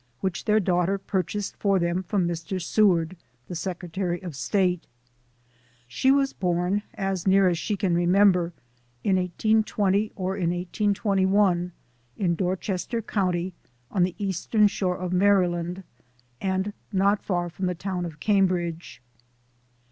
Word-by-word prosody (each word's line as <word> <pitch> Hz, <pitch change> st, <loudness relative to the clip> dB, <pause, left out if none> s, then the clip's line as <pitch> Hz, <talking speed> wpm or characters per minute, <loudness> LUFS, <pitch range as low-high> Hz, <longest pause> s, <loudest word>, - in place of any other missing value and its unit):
which 190 Hz, 0 st, -3 dB
their 215 Hz, 0 st, +4 dB
daughter 180 Hz, 0 st, +1 dB
purchased 195 Hz, +1 st, -3 dB
for 200 Hz, -2 st, +2 dB
them 170 Hz, +1 st, 0 dB
from 190 Hz, -1 st, 0 dB
Mr. 170 Hz, +2 st, -3 dB
Seward, 180 Hz, -2 st, +2 dB, 0.3 s
the -, -, -6 dB
Secretary 175 Hz, 0 st, -3 dB
of 180 Hz, -, -5 dB
StatA 180 Hz, +3 st, +1 dB, 1.1 s
She 125 Hz, -, +1 dB
was 275 Hz, 0 st, +3 dB
born, 180 Hz, +2 st, 0 dB
as 195 Hz, -2 st, -2 dB
near 195 Hz, 0 st, +5 dB
as 175 Hz, -2 st, +1 dB
she 205 Hz, +2 st, -2 dB
can 185 Hz, -2 st, 0 dB
remember, 180 Hz, 0 st, +4 dB, 0.5 s
in 190 Hz, -2 st, +3 dB
1820 210 Hz, +2 st, +1 dB
or 190 Hz, 0 st, -2 dB
in 180 Hz, -4 st, 0 dB
1821, 190 Hz, 0 st, +1 dB, 0.5 s
in 180 Hz, -4 st, +1 dB
Dorchester 190 Hz, +5 st, -2 dB
County, 185 Hz, -3 st, -1 dB, 0.4 s
on 190 Hz, -, 0 dB
the 180 Hz, 0 st, +1 dB
Eastern 205 Hz, +2 st, +1 dB
shore 185 Hz, -2 st, -1 dB
of 180 Hz, -1 st, -3 dB
Maryland, 180 Hz, -2 st, +2 dB, 0.6 s
and 190 Hz, +1 st, -1 dB, 0.2 s
not 200 Hz, +1 st, +2 dB
far 175 Hz, -2 st, -1 dB
from 185 Hz, +2 st, -3 dB
the 180 Hz, -, -1 dB
town 180 Hz, 0 st, -3 dB
of 160 Hz, -3 st, -7 dB
Cambridge. 180 Hz, -, 0 dB
185 Hz, 135 wpm, -25 LUFS, 175-200 Hz, 1.1 s, near